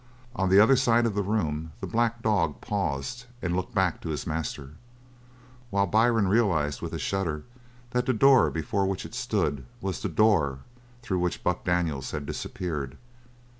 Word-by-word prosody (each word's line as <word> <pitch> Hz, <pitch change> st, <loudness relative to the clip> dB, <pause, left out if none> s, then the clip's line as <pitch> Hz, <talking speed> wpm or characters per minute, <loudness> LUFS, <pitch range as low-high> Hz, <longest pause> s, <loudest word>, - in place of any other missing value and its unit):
On 95 Hz, -5 st, +1 dB
the 95 Hz, +2 st, +7 dB
other 110 Hz, +6 st, +7 dB
side 120 Hz, -2 st, +3 dB
of 115 Hz, -, 0 dB
the 100 Hz, -, 0 dB
room 80 Hz, -7 st, -2 dB
the -, -, -4 dB
black 115 Hz, 0 st, 0 dB
dog 90 Hz, -9 st, +1 dB
paused 100 Hz, -, -3 dB
and 85 Hz, -5 st, -2 dB
looked 95 Hz, +3 st, -3 dB
back 95 Hz, -4 st, +1 dB
to 80 Hz, -, -5 dB
his 75 Hz, -, -3 dB
master, 75 Hz, -3 st, -4 dB, 1.0 s
while 100 Hz, -2 st, +2 dB
Byrne 110 Hz, +1 st, +3 dB
realised 90 Hz, -, +1 dB
with -, -, -4 dB
a -, -, -2 dB
shudder 85 Hz, -6 st, -2 dB, 0.5 s
that 125 Hz, 0 st, 0 dB
the -, -, +4 dB
door 135 Hz, +2 st, +6 dB
before 95 Hz, +5 st, -1 dB
which 95 Hz, -1 st, -3 dB
it -, -, -10 dB
stood 100 Hz, -, -1 dB, 0.2 s
was 95 Hz, -4 st, -3 dB
the -, -, -2 dB
door 80 Hz, -12 st, +2 dB, 0.4 s
through 95 Hz, -5 st, -1 dB
which 90 Hz, 0 st, -2 dB
Buck 90 Hz, -, 0 dB
Daniels 85 Hz, -6 st, 0 dB
had 75 Hz, -2 st, -4 dB
disappeared. 75 Hz, -4 st, -4 dB
95 Hz, 170 wpm, -27 LUFS, 80-110 Hz, 1.0 s, the